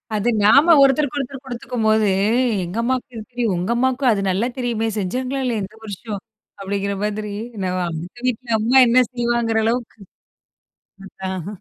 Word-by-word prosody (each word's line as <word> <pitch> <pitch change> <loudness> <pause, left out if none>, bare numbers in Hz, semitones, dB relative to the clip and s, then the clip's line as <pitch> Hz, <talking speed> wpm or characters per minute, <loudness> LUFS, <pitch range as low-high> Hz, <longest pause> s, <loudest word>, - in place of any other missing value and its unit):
அது 215 +3 +1
நாம 280 +11 +6
ஒருத்தருக்கு 275 0 +2
ஒருத்தர் 270 0 -6
குடுத்துக்கும்போது, 225 -4 0 0.6
எங்க 175 +5 -6
அம்மாவுக்கு 255 +1 -2
இது 220 - -6
தெரியும். 235 -5 0
உங்க 180 +6 -2
அம்மாவுக்கும் 260 0 +2
அது 200 -2 0
நல்லா 200 +6 +1
தெரியுமே! 235 -3 -1
செஞ்சாங்களா 255 +8 -2
இல்லயா? 230 -4 -1
இந்த 200 +3 -9
வருஷம் 205 0 -6 0.4
அப்பிடிங்கிற 200 0 -2
மாதிரி 210 0 -3 0.3
என்ன 185 -2 -2 0.2
அந்த 170 +8 -7
வீட்ல 235 -2 0
அம்மா 235 +5 +3
என்ன 245 +2 +5
செய்வாங்கிற 235 -2 0
அளவுக்கு 235 0 -2 1.1
அதான். 190 -2 -6
230 Hz, 145 wpm, -20 LUFS, 200-250 Hz, 1.1 s, நாம